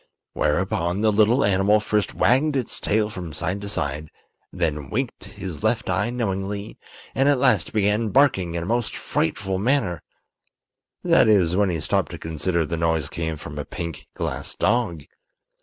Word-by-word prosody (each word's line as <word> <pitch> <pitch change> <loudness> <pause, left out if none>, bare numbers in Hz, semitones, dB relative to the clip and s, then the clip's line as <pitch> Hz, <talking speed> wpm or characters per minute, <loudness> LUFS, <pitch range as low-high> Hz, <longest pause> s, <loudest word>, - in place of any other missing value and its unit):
Whereupon 85 +4 0
the 110 -1 +4
little 110 +5 +4
animal 100 +2 +3
first 105 -1 -1
wagged 140 +4 +3
its 130 -4 -3
tail 105 0 +1
from 90 -6 -7
side 90 +6 -2
to 100 - -5
side, 75 -4 -3 0.4
then 75 -6 -2
winked 130 - -3
his 95 -6 -7
left - - 0
eye - - +1
knowingly, 100 -3 -3 0.3
and 135 +2 +3
at 145 - +4
last 125 -8 +2
began 105 +1 +1
barking 100 -11 +3
in 85 - -2
a - - -5
most 120 +3 -1
frightful 95 +3 -1
manner—that 110 - -2
is, 90 -5 +4
when 100 0 +3
you 85 -3 -2
stop - - 0
to - - -7
consider 80 +1 -1
the 85 +2 -3
noise 80 -3 0
came 80 -2 -3
from 75 0 -8
a - - -2
pink 85 +1 -6
glass - - -4
dog. 105 -11 0
95 Hz, 160 wpm, -23 LUFS, 85-110 Hz, 0.4 s, the